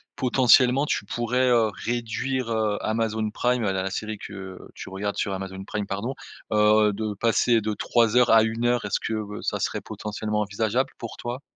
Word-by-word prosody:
potentiellement 125 +1 +4
tu - - -1
pourrais, 120 +4 0
heu, 115 -3 +4 0.2
réduire, 120 +1 -2
heu, 110 -2 0
Amazon 110 -1 -1
Prime, 125 +1 0
la 95 -2 0
la 95 - -3
série 110 +1 -4
que 95 -2 -8 0.2
tu - - -8
regardes 100 +2 -4
sur 100 - -1
Amazon 95 0 -6
Prime 105 0 -3
pardon. 100 +7 -3 0.4
Heu, 105 0 +4
de 110 0 -3
passer 115 +2 +3
de 110 0 -2
3 115 +2 +1
heures 125 -1 +5
à 110 -1 +7
1 115 +1 -1
heure 120 -2 +1
est-ce 100 - -1
que 105 -2 -4
ça - - -2
serait - - -2
potentiellement 105 0 -4
envisageable 110 +5 0
pour 115 - -7
toi? 120 +3 -5
110 Hz, 180 wpm, -25 LUFS, 105-120 Hz, 0.4 s, à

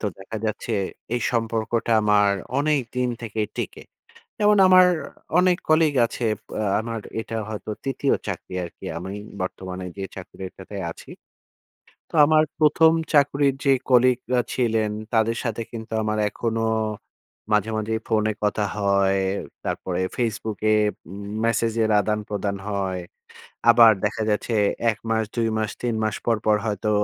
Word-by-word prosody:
তো - - -5
দেখা 95 +4 -7
যাচ্ছে, 110 +2 -3 0.4
এই 120 - 0
সম্পর্কটা 115 0 0
আমার 105 -1 +4 0.3
অনেক 150 -1 +2 0.2
দিন 125 0 +1
থেকে 110 -1 -4 0.2
টেকে। - - -4 0.6
যেমন 210 0 +4
আমার 185 0 +8 0.5
অনেক 180 -1 +4
কলিগ 155 -2 +4
আছে 120 - -5 0.4
আ - - 0 0.2
আমার 115 0 -4 0.2
এটা 115 +1 -5
হয়তো 110 0 -5
৩য় 135 0 +1
চাকরি 95 -1 -5
আরকি। 85 - -10
আমি 95 +3 -6 0.3
বর্তমানে 95 0 -5
যে 100 - -4
চাকরিটাতে 95 +1 -9 0.2
আছি। - - -14 1.0
তো - - -18
আমার 155 0 +5 0.2
১ম 160 +1 +5 0.2
চাকুরির 140 -1 +3
যে 140 - +5 0.2
কলিগরা 125 0 +3
ছিলেন, 110 -4 +1 0.2
তাদের 115 +1 +2
সাথে 115 -1 -2
কিন্তু 115 -1 -8
আমার 110 0 -1
এখনো 115 -1 -2 0.9
মাঝে, 105 +1 +2
মাঝেই 110 +1 -1
ফোনে 110 -1 +2
কথা 105 0 +1
হয়। 100 -1 +2 0.4
তারপরে 90 -1 -2 0.2
ফেসবুকে 110 -2 -1 0.4
উম 100 +1 -7 0.2
ম্যাসেজের 115 -1 +1
আদান-প্রদান 105 -1 -2
হয়। 95 -2 -2 0.7
আবার 115 -1 +8
দেখা 110 - -1
যাচ্ছে 110 +2 0 0.4
১ 105 - -8
মাস, 110 0 +2
২ 115 -1 +1
মাস, 110 -1 -1
৩ 120 -2 -1
মাস 110 -1 0
পর, 115 -2 +2
পর 105 -1 +5
হয়তো 105 0 -1
110 Hz, 140 wpm, -23 LUFS, 105-120 Hz, 1.0 s, আমার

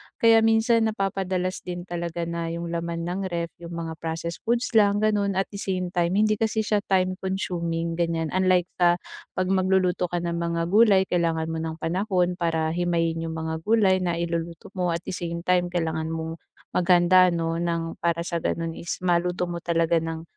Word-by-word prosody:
Kaya 225 -1 +5
minsan 225 0 +3
napapadalas 190 -3 -1
din 175 -1 -6
talaga 170 -1 -4
na 170 0 -3
'yong 170 0 -4
laman 170 0 -3
ng 180 +3 -3
ref 170 -1 -3
'yong 170 0 -8
mga 165 -1 -4
processed 165 +1 -4
foods 235 +1 +1
lang, 205 -1 +4
gano'n. 205 -2 +1
At 190 +2 -1
the 200 - -7
same 185 -2 -2
time 175 +1 +1
hindi 215 0 +2
kasi 220 -1 +1
siya 210 0 +1
time-consuming, 185 -3 -1
ganiyan. 165 -2 0
Unlike 185 -1 +3 0.2
sa 175 -1 +5 0.4
'pag 185 0 0
magluluto 185 -1 +2
ka 175 0 -3
ng 170 0 -2
mga 170 0 -1
gulay 205 -3 +6
kailangan 165 -3 0
mo 160 - -3
ng 160 0 -3
panahon 180 0 0
para 160 -2 0
himayin 165 -1 0
'yong 160 - -5
mga 160 0 -3
gulay 200 -4 +4
na 175 -2 -1
iluluto 170 +1 -4
mo. 180 -2 -1
At 170 - -5
the - - -5
same 170 -2 -4
time 180 -1 +2
kailangan 160 -2 -2
mong 160 0 -4 0.3
maghanda, 180 +1 +5
'no, 165 -1 -1
nang 170 -1 -2
para 170 0 0
sa 170 -1 -2
gano'n 165 0 -2
is 170 +1 -5
maluto 180 0 +1
mo 170 - -4
talaga 165 0 +1
ng 165 0 -5
175 Hz, 185 wpm, -25 LUFS, 165-185 Hz, 0.4 s, gulay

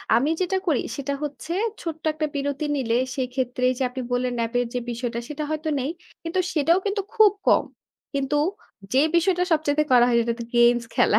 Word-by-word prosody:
আমি 260 +6 +2
যেটা 370 +1 +1
করি 300 -7 +3 0.2
সেটা 280 0 -2
হচ্ছে, 295 +3 -5 0.3
ছোট্ট 320 -2 -5
একটা 310 0 -1
বিরতি 285 +1 -2
নিলে, 240 -4 0 0.2
সেই 260 -2 -1
ক্ষেত্রে 250 -1 -2
এইযে 255 +1 -2
আপনি 260 +1 -5
বললেন 245 0 0
ন্যাপ 230 0 -1
এর 245 - +1
যে - - +1
বিষয়টা, 235 0 -3
সেটা 300 0 -4
হয়তো 310 0 -2
নেই। 265 +2 -2 0.3
কিন্তু 335 +3 -1
সেটাও 325 +3 +3
কিন্তু 405 0 0
খুব 430 -2 +6 0.2
কম। - - +5 0.5
কিন্তু 275 +1 -1 0.6
যে 260 - +5 0.2
বিষয়টা 355 +1 +3
সবচাইতে 305 -1 +2
করা 245 -1 +7
হয় 245 - +2
সেটা 235 0 0
তো - - -3
গেমস 240 0 +5
খেলা। 210 - +4
280 Hz, 195 wpm, -24 LUFS, 245-315 Hz, 0.6 s, করা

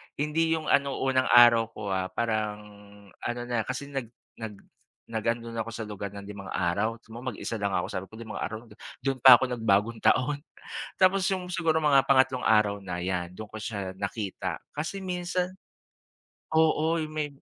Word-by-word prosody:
hindi 160 +3 +1
yung 160 - -4
ano 140 -1 +3
unang 130 -1 +2
araw 120 -2 +7
ko, 105 -2 -4
ah. 95 -1 0
Parang 110 -2 -1 0.6
ano 120 0 -3
na 120 -2 -2
kasi 140 +3 -4
nag 135 -4 -3 0.3
nag 110 -2 -6 0.6
nag 110 -1 -3
andun 115 0 -1
na 115 - -4
ako 115 +1 -4
sa 115 - -4
lugar 105 -2 -5
ng 100 - -7
limang 100 -1 -8
araw 100 +6 0
so - - -19
mag-isa 120 -2 -5
lang 100 -1 0
ako 90 - -1
sabi 95 0 -3
ko 110 - -13
5 115 -2 -7
araw 110 +1 -4 0.4
dun 135 -1 -1
pa 130 -2 +11
ako 125 - 0
nag 120 - -3
bagong 105 +4 +3
taon. 140 +3 +2 0.6
Tapos 190 +1 +4
yung 185 -2 -2
siguro 165 -3 +1
mga 145 -3 +5
pangatlong 130 -1 +4
araw 105 -2 +3
na 90 -2 -5
yan, 90 -1 -2
dun 110 - -6
ko 110 - -24
siya 100 -5 -4
nakita 100 +1 -4 0.2
kasi 160 +6 -3
minsan. 180 0 -2 1.0
Oo 160 +1 +3
yung 155 -1 -3
may 155 -1 -2
115 Hz, 185 wpm, -28 LUFS, 105-145 Hz, 1.0 s, pa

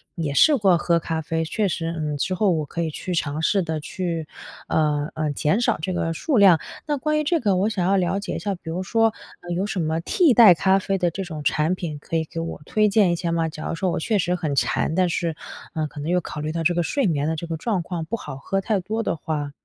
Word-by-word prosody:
也 155 -5 -2
试 295 - +5
过 195 -6 +4
喝 170 0 +2
咖 160 0 -3
啡， 160 +1 -2
确 205 +5 0
实， 165 -1 -2
嗯， 150 -2 -2
之 180 +6 -1
后 195 +1 +2
我 155 -3 0
可 170 +4 -4
以 165 - -1
去 180 +4 -5
尝 150 -2 -1
试 195 +4 +2
的 160 -2 -3
去， 165 0 -4 0.4
呃， 150 -1 +1
呃， 155 -2 -1
减 155 - +1
少 - - +2
这 185 +3 -2
个 165 -2 -1
数 265 - 0
量。 190 -5 +7 0.3
那 295 - 0
关 305 +3 0
于 305 - 0
这 330 +3 +1
个， 205 -7 +2
我 195 +4 +2
想 190 -5 -1
要 195 - +3
了 185 +1 0
解 200 - -4
一 - - -3
下， 200 -2 -2
比 175 - -10
如 175 +3 -2
说， 225 +2 +2 0.3
嗯， 175 0 -5
有 190 - 0
什 205 -2 -3
么 160 +1 0
替 320 - +3
代 225 -5 +9
咖 190 +4 +3
啡 195 0 -1
的 175 -2 +1
这 195 +3 -4
种 155 -4 -7
产 155 +5 +1
品 165 -5 -5
可 165 - -6
以 160 - +2
给 165 +1 -7
我 165 -2 -5
推 215 +4 +2
荐 200 -3 +4
一 - - +1
下 170 0 -2
吗？ 165 -1 +1
假 155 0 -7
如 - - -2
说 185 +1 -1
我 - - -1
确 215 +5 0
实 180 -1 0
很 155 -5 -2
馋， 155 - +1
但 185 0 +3
是， 170 -1 -1 0.4
嗯， 155 -1 -1
可 145 - -10
能 150 - -4
又 180 +1 +3
考 150 - -6
虑 155 +1 -2
到 165 0 -2
这 175 +2 +3
个 175 - +1
睡 275 - 0
眠 150 -5 +1
的 160 - 0
这 160 - -5
个 165 - -3
状 195 +1 -1
况 170 -1 -4
不 230 - -3
好 135 -8 -8
喝 195 +7 -2
太 210 0 0
多 220 +5 -3
的 170 - -1
话 150 -2 -3
170 Hz, 295 characters per minute, -23 LUFS, 160-195 Hz, 0.4 s, 代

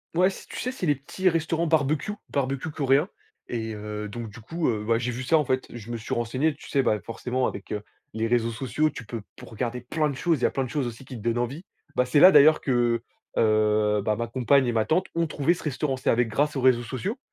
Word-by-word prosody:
Ouais. 180 +2 +5
Si, 195 - -10
tu - - -7
sais, 255 - -2
c'est 255 -9 -4
les 145 - +3
petits 185 +8 0
restaurants 165 0 0
barbecue, 155 +5 +1 0.2
barbecue 135 +2 -2
coréen, 140 +2 +2 0.4
et 115 -2 -3
heu, 105 0 -5
donc 115 +1 -6
du 105 - -12
coup, 165 +9 -2
heu, 110 -3 -1
ouais, 115 +1 +2
j'ai 125 +1 -2
vu 125 +2 -5
ça, 160 +5 +4
en 150 - +1
fait. 130 0 0
Je 120 -1 -8
me 120 - -2
suis 110 - -5
renseigné, 130 +7 0
tu - - -13
sais, 140 - +2
bah, 105 -5 +1
forcément 125 +3 -2
avec, 100 - -7
heu, 105 - -2 0.3
les 110 +1 -1
réseaux 115 -1 +1
sociaux, 135 +6 0
tu 115 -5 -9
peux 115 +1 -5
pour - - -12
regarder 120 +2 -3
plein 150 +5 -1
de 140 - -4
choses, 165 +2 +1
il - - -6
y - - +6
a - - -3
plein 135 - -1
de 125 - -5
choses 140 -1 -1
aussi 120 +2 -8
qui 125 - -8
te - - -9
donnent 115 +2 0
envie. 130 +9 -3 0.3
Bah, 125 - +3
c'est 135 +3 +3
là 185 - +10
d'ailleurs 155 -2 +7
que, 120 -3 +1 0.3
heu, 105 -1 +3
bah, 105 +1 +1
ma 115 +1 -3
compagne 130 +3 +3
et 120 - +1
ma 110 -2 +1
tante 180 +4 +1
ont 165 -1 +1
trouvé 150 +3 +1
ce 175 - -9
restaurant. 140 -2 -1
C'est 130 - -1
avec 120 0 +2
grâce 145 +6 0
aux 135 - -1
réseaux 125 -2 +4
sociaux, 185 - -4
130 Hz, 265 wpm, -26 LUFS, 115-150 Hz, 0.4 s, là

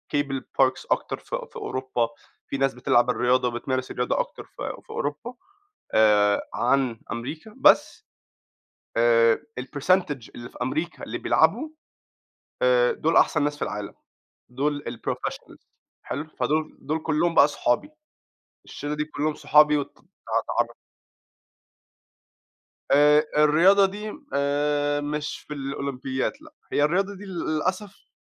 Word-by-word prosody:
cable 140 -2 -1 0.2
parks 130 -1 +2
أكتر - - 0
ف - - -5
في - - -8
أوروبا، 130 -3 -2 0.4
في 140 - -3
ناس 135 0 +1
بتلعب 120 0 +2
الرياضة 125 +1 +2
وبتمارس 130 +2 -3
الرياضة 125 0 -1
أكتر - - -4
ف - - -9 0.2
في - - -36
أوروبا 150 +12 -4 0.6
آآ، 105 -2 +4
عن 130 -5 +1
أمريكا 145 - -6
بس - - +4 0.9
آآ، 115 -1 +4 0.2
الpercentage 145 0 0
اللي 120 0 -8
في - - -15
أمريكا 300 +4 -3
اللي - - -5
بيلعبوا 310 - +2 0.9
آآ، - - +4
دُول - - 0
أحسن 150 -3 +4
ناس 145 0 0
في - - -18
العالم، 105 -1 -4 0.6
دُول 145 +3 -2
الprofessionals - - -6 0.4
حلو؟ 145 +4 -5
فدُول 155 +1 -1
دُول 155 +3 -2
كلّهم 165 +2 +1
بقى 140 -1 +7
صحابي 135 - 0 0.8
الشِلّة 145 +1 -5
دي 150 - -1
كلّهم 155 0 -2
صحابي 150 0 +4
وأت 145 - -2
اتع - - -26 0.4
اتعر - - +1 2.2
آآ، 150 +2 +6 0.2
الرياضة 180 +7 +6
دي 210 +2 -5 0.2
آآ، 145 +1 +1
مش 150 +1 -3
في 150 - -5
الأولمبياد 135 -2 -3
لأ، 310 -1 -16 0.2
هي 145 - +2
الرياضة 195 +6 +1
دي 200 +2 -10
لل 185 -3 -6 0.2
للأسف، 190 +5 -3
145 Hz, 130 wpm, -25 LUFS, 130-160 Hz, 2.2 s, بقى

